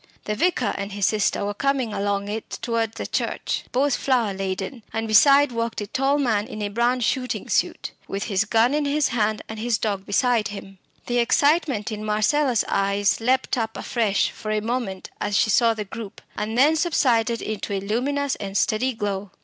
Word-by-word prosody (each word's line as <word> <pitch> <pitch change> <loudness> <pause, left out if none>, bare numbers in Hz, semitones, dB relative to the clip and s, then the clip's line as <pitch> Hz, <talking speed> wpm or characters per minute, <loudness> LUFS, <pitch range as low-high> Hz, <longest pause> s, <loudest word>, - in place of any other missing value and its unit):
The 210 - -2
vicar 255 - +1
and 200 0 -4
his 200 -1 0
sister 210 -1 +1
were 205 - -2
coming 265 -1 0
along 200 0 -1
it 215 +2 -5
towards 230 -2 -1
the - - -5
church, - - -2
both 270 +1 +2
flower 240 -7 +1
laden, 195 +4 -4
and 225 0 -2
beside 275 +6 +6
walked 230 -1 -2
a 205 - -3
tall 270 +6 +1
man 225 -7 +1
in 215 - -6
a 205 - -1
brown 240 +4 +1
shooting 250 +2 -1
suit, - - 0 0.2
with 195 +1 -3
his 200 -1 0
gun 225 +4 +3
in 300 0 +1
his 290 0 +1
hand 215 -2 0
and 220 0 -7
his 230 0 0
dog 200 -3 -3
beside 230 +2 +2
him. 195 -2 -9 0.3
The 245 0 0
excitement 275 -3 +2
in 215 0 -5
Marcella's 225 +4 +2
eyes 200 0 +1
leapt 255 +1 +1
up 225 -1 -3
afresh 215 -5 0
for 215 - -8
a 215 0 +1
moment 220 -4 -3
as 205 - 0
she 215 - +3
saw 230 +2 +4
the 210 -1 -4
group, 215 0 -8 0.2
and 215 +2 -3
then 295 +5 +5
subsided 245 -9 +2
into 215 -1 -4
a 195 - 0
luminous 265 +8 -1
and 200 -1 -4
steady 255 +4 +1
glow. 205 -2 -3
225 Hz, 190 wpm, -23 LUFS, 205-255 Hz, 0.3 s, beside